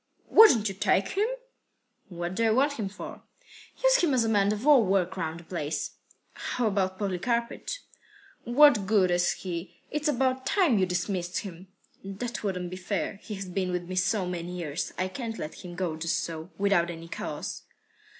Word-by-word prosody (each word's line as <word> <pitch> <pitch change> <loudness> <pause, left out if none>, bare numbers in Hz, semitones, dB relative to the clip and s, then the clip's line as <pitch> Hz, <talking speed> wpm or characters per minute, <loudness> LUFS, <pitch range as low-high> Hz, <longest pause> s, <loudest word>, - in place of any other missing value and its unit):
"Wouldn't 250 - +7
you 195 - -2
take 195 0 +2
him?" 410 +3 +1 0.8
"What 175 -1 -4
do 230 - 0
I - - +4
want 270 +6 +3
him 200 -3 -2
for?" 205 - -9 0.6
"Use - - +6
him 320 - +2
as 230 -3 +2
man 205 -2 +3
of 215 +4 -3
all 290 -5 +7
work 190 -2 +1
round 160 0 -3
the - - -13
place." 160 -3 -3 0.4
"How 245 - -2
about 190 -3 0
Polikarpych?" 235 - -2 0.7
"What 240 -5 +5
good 195 -4 +3
is 175 0 +3
he? 175 -1 -6
It's 300 0 -1
about 260 -2 +1
time 335 - +3
you 185 - +2
dismissed 180 0 -2
him." 185 -1 -9 0.4
"That 195 +5 -5
wouldn't 180 -3 -2
be 185 - -5
fair. 195 +1 -3
He 215 - -6
has 195 0 -5
been 185 0 -2
with 180 0 -2
me 185 +1 -6
so 185 +2 +1
many 180 0 -4
years. 160 -2 -3
I 185 - 0
can't 225 +3 -5
let 155 - -7
him 175 -1 -8
go 175 -3 -2
just 160 +1 -1
so, 165 +1 -6
without 195 -4 +2
any 165 -1 -7
cause." - - -5
195 Hz, 180 wpm, -28 LUFS, 180-230 Hz, 0.8 s, Wouldn't